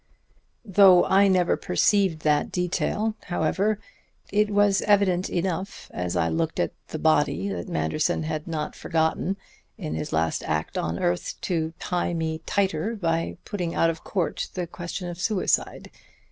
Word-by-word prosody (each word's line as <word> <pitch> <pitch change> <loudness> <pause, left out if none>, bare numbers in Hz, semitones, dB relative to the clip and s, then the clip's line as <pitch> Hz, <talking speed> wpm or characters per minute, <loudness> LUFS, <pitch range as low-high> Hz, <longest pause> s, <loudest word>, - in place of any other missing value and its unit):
"Though 195 -3 +6
I 200 +1 +5
never 185 -2 +3
perceived 185 -2 +2
that 150 -1 +2
detail, 190 +4 0
however, 190 +5 0 0.6
it 210 0 +3
was 205 -1 +3
evident 195 -3 +3
enough 185 +2 -3
as 90 -1 -3
I 85 - +2
looked 80 0 -1
at - - 0
the - - -5
body 95 +5 +2
that 90 -3 -4
Manderson 80 - 0
had 155 0 -4
not 155 -2 -3
forgotten, 165 +4 0 0.4
in 75 - -4
his 80 - -4
last 80 0 0
act 75 0 -2
on 85 +1 -1
earth, 90 0 -1
to 160 -2 -1
tie 175 -1 -1
me 160 -1 -2
tighter 195 +2 0
by 165 -5 -1
putting 175 -5 -3
out 165 - +3
of 165 - -10
court 180 -6 -2
the 180 -2 -2
question 175 +2 -6
of 175 0 -6
suicide. 205 -2 0
175 Hz, 150 wpm, -25 LUFS, 155-195 Hz, 0.6 s, Though